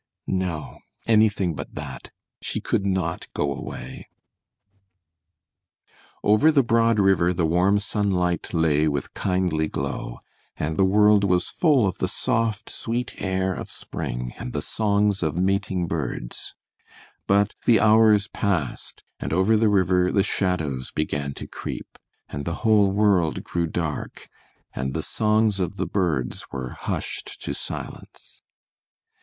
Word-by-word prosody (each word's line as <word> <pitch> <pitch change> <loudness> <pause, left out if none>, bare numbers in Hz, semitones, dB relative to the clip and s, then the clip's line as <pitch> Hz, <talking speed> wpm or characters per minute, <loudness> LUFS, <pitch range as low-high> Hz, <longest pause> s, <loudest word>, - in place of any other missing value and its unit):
No, 90 -5 -3 0.3
anything 105 -5 +3
but - - -8
that! 70 -2 -7 0.3
She - - -3
could 100 - -1
not 95 -4 -1
go 70 -1 0
away. - - -8 2.2
Over 105 +10 +5
the 140 -3 +4
broad 115 -1 +3
river 95 -3 +4
the 85 -1 0
warm 90 +5 +3
sunlight 95 -5 0
lay 80 -3 +2
with 70 -3 -2
kindly 90 -4 0
glow, - - -4 0.4
and 80 +1 -2
the 95 - +3
world 105 +1 +5
was 90 -2 +1
full 145 - +3
of 95 - -3
the 95 - +1
soft, 115 0 -1
sweet 120 +2 -4
air 95 -1 0
of - - -6
spring, - - -5
and 60 - -6
the - - -2
songs 105 -2 +1
of 80 -1 -1
mating 95 -1 0
birds; 75 -7 -4 0.7
but 100 +1 +3
the 115 -2 +5
hours 110 -2 +5
passed, 90 -11 -2 0.2
and 70 - -4
over 95 +7 +3
the 110 0 +3
river 90 -2 +3
the 100 - +3
shadows 80 -11 -1
began 70 -2 -2
to - - -7
creep, - - -7 0.3
and 70 - -5
the 85 - -2
whole 105 -3 +5
world 100 -5 +2
grew 85 -1 -1
dark, 80 -2 -4 0.4
and 65 +1 -3
the - - -1
songs 105 -1 +1
of 90 -2 -2
the 95 - -2
birds 80 -8 -1
were 65 -2 -4
hushed - - -5
to - - -3
silence. - - -8
95 Hz, 140 wpm, -24 LUFS, 80-105 Hz, 2.2 s, Over